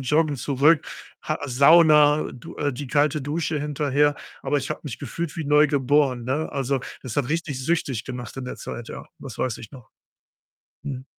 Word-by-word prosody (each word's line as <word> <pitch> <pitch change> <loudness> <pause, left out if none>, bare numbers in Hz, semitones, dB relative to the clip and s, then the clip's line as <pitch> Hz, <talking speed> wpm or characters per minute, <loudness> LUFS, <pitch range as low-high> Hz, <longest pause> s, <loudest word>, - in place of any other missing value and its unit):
joggen 150 +2 +1
zurück, 140 +5 +3 0.4
Ha 155 - -2
Sauna, 150 +2 +6
du 130 +7 -11
äh, 145 -1 -1
die 135 +1 -6
kalte 150 +1 +2
Dusche 155 +2 -2
hinterher. 145 0 +1 0.3
Aber 145 - +1
ich 135 - -5
habe - - -3
mich 140 -6 -6
gefühlt 150 +4 -5
wie 160 - -3
neu 150 +1 +5
geboren, 140 -3 +2
ne? 140 +5 -2
Also, 135 -1 0 0.2
das 125 -4 -6
hat 125 - 0
richtig 155 -5 -2
süchtig 140 -8 -1
gemacht 125 -3 -7
in 135 - -5
der 125 - -6
Zeit, 120 - -7
ja. - - -8
Das - - -9
weiß 125 -4 -1
ich 110 - -10
noch. 125 -4 -13 1.0
Mhm. 130 -2 -6
145 Hz, 180 wpm, -24 LUFS, 130-150 Hz, 1.0 s, Sauna